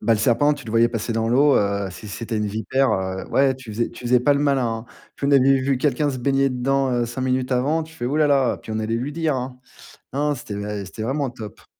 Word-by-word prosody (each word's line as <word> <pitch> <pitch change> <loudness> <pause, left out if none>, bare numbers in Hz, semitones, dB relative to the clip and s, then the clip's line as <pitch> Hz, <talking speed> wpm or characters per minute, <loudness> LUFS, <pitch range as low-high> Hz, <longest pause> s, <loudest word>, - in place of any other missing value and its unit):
Bah, 115 - +2
le 110 - +2
serpent, 125 +6 +3
tu 145 -2 -7
le 110 - -5
voyais 115 +1 +4
passer 115 0 -3
dans 115 0 0
l'eau, 140 +4 +5
heu, 100 -1 0
si 105 +3 -10
c'était 110 +2 -4
une 105 0 0
vipère, 110 +6 0
heu. 95 0 -2
Ouais, 135 -1 +3
tu 130 -4 -10
faisais 115 +3 -1
tu 120 - -12
faisais 120 0 +4
pas 145 +2 +3
le 140 - 0
malin, 140 -4 +2
hein. 115 0 -3 0.3
Puis 140 - -2
on 140 - +2
avait 135 0 +5
vu 135 -1 0
quelqu'un 145 +1 +1
se 130 - -5
baigner 135 +1 +2
dedans, 135 +1 0
heu, 120 -1 +1
5 120 +2 -5
minutes 130 0 0
avant, 145 +6 +1
tu 160 +1 -12
fais: 160 - -5
«Hou, 140 - -1
là, 155 -1 +4
là». 135 -3 +2
Puis - - -10
on 110 - -2
allait 115 +1 -1
lui 135 +5 -3
dire, 160 -2 0
hein. 125 0 -4 0.6
Non, 145 +2 0
non, 145 - 0
c'était, 115 -5 -8 0.3
eh, - - -7
c'était 95 - -9
vraiment 135 +3 -1
top. 115 -4 -10
125 Hz, 275 wpm, -22 LUFS, 115-140 Hz, 0.6 s, l'eau